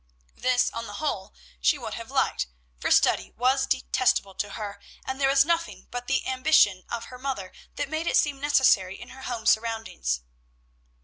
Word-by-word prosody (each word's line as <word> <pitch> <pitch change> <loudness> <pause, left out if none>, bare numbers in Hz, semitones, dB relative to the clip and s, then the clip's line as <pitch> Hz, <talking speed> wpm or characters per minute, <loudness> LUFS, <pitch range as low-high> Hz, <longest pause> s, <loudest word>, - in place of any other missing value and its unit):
This, 250 -1 +2
on 230 0 -5
the 205 - -8
whole, 205 -8 -3 0.3
she - - +3
would - - -6
have - - -7
liked, 60 - 0 0.3
for - - -1
study - - +4
was 260 +2 +2
detestable 255 -6 +1
to 205 +1 -4
her, 205 -2 -6 0.3
and 265 +1 -4
there 270 - +4
was 275 0 +5
nothing 335 0 -1
but 245 0 -5
the 270 0 +1
ambition 255 -8 +3
of 235 -1 -3
her 250 - -9
mother 255 -9 -4 0.2
that - - -2
made 315 +3 -3
it - - +3
seem 285 -2 +1
necessary 240 -10 +3
in 240 +2 -10
her 265 - -12
home 240 -4 -5
surroundings. 220 - 0
250 Hz, 180 wpm, -26 LUFS, 205-270 Hz, 0.3 s, was